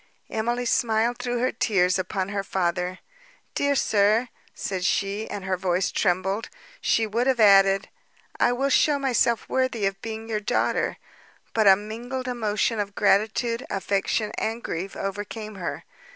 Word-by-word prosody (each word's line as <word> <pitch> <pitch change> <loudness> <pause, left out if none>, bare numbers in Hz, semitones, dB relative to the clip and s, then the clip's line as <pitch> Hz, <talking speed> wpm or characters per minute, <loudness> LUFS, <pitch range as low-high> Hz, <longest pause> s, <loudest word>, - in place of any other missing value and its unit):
Emily 240 +3 -1
smiled 235 0 +1
through 245 0 -2
her 250 +2 +1
tears 185 -5 +2
upon 185 +1 -2
her 200 -1 -2
father: 180 -1 -1 0.6
"Dear 285 0 +1
sir," 215 +1 +2 0.3
said 190 -2 -3
she, 200 +4 0
and 205 -2 -5
her 190 -1 0
voice 180 0 0
trembled; 190 +4 0 0.3
she 225 - +2
would 230 +4 -1
have 260 -2 +2
added, 195 -2 +6 0.5
"I - - +4
will 270 +3 0
show 295 +2 +4
myself 250 -4 +1
worthy 255 -5 0
of 195 0 -2
being 225 0 -6
your 220 -2 -1
daughter;" 210 - 0 0.6
but 220 -2 +3
a 190 - +9
mingled 235 +6 -6
emotion 225 -2 0
of 200 -1 -3
gratitude, 220 +4 +2
affection, 200 +2 -1
and 225 +2 -2
grief 180 +4 -4
overcame 205 +2 -5
her. 185 -4 -5
215 Hz, 150 wpm, -25 LUFS, 195-235 Hz, 0.6 s, a